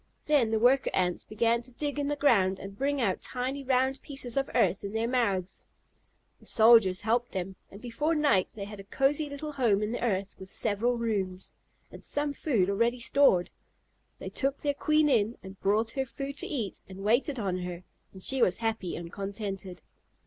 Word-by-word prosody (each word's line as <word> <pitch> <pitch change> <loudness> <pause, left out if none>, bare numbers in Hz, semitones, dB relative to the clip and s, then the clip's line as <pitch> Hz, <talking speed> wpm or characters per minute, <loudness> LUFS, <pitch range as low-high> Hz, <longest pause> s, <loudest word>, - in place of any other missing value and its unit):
Then 285 -7 +3
the 220 - +1
worker 255 +4 +4
Ants 180 -1 0
began 230 +2 +1
to 250 +1 -13
dig 290 +2 -3
in 285 - -1
the 290 - 0
ground 200 -10 +3
and 195 0 -9
bring 280 +5 0
out 200 -7 0
tiny 260 +2 -3
round 265 +1 +1
pieces 270 -4 -4
of 275 0 0
earth 185 +1 +2
in 200 +1 -5
their 225 +1 0
mouths. 200 -7 -1 0.7
The - - -16
soldiers 220 -5 +5
helped 235 +3 0
them, 190 0 -4
and 200 - -12
before 295 +8 -1
night 290 -12 +3
they 200 -2 -5
had 205 0 -9
a - - -8
cosy 280 +8 0
little 285 +2 -5
home 230 -8 +2
in 210 - -2
the 240 - -3
earth, 200 -4 -1
with 190 0 -10
several 230 +4 +1
rooms, 195 -5 -2 0.4
and - - -12
some 290 0 0
food 235 - +1
already 230 +5 +1
stored. 230 -7 +3 0.7
They - - -6
took 275 +1 -1
their 290 -1 -1
queen 305 +1 +2
in, 230 -4 +2
and 190 0 -11
brought 215 +3 +1
her 265 +1 -2
food 275 +3 -6
to - - -4
eat, 230 -10 -4
and 190 +1 -9
waited 245 +6 +2
on 195 -5 -1
her, 180 0 -6 0.3
and 190 -1 -10
she 265 -1 0
was 185 -5 +3
happy 225 -6 -2
and 170 0 -7
contented. 195 -2 -5
230 Hz, 195 wpm, -29 LUFS, 195-270 Hz, 0.7 s, soldiers